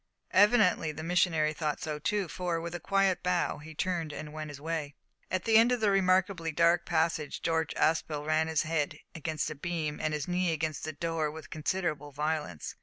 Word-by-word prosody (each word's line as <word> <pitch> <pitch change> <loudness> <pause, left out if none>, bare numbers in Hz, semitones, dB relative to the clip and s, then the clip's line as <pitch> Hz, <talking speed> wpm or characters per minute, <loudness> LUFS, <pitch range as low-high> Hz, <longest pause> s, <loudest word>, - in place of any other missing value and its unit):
Evidently 205 -5 +5
the 155 +1 -7
missionary 165 -3 +2
thought 150 -1 -2
so 155 -4 -4
too, 200 +4 0
for, 175 0 -2
with 170 +1 -5
a 175 - -4
quiet 195 0 +2
bow, 180 -4 0
he 155 +1 -11
turned 170 -3 -1
and 150 0 -7
went 155 -1 -5
his 145 -1 -8
way. 155 -2 -3 0.3
At 185 -1 -1
the 225 -1 +6
end 230 +2 +6
of 245 -3 0
a 205 - +4
remarkably 185 -3 +2
dark 170 +2 +3
passage 160 -3 0
George 160 -1 0
Aspel 155 -2 +1
ran 155 +1 +2
his 160 -1 +1
head 155 -2 -1 0.2
against 160 -2 -2
a - - -2
beam 155 -1 -3
and 155 - 0
his 150 -2 -2
knee 180 -1 +1
against 155 0 -3
a - - -2
door 160 0 -1
with 155 0 -10
considerable 155 -2 -2
violence. 150 - -3
160 Hz, 195 wpm, -30 LUFS, 155-180 Hz, 0.3 s, the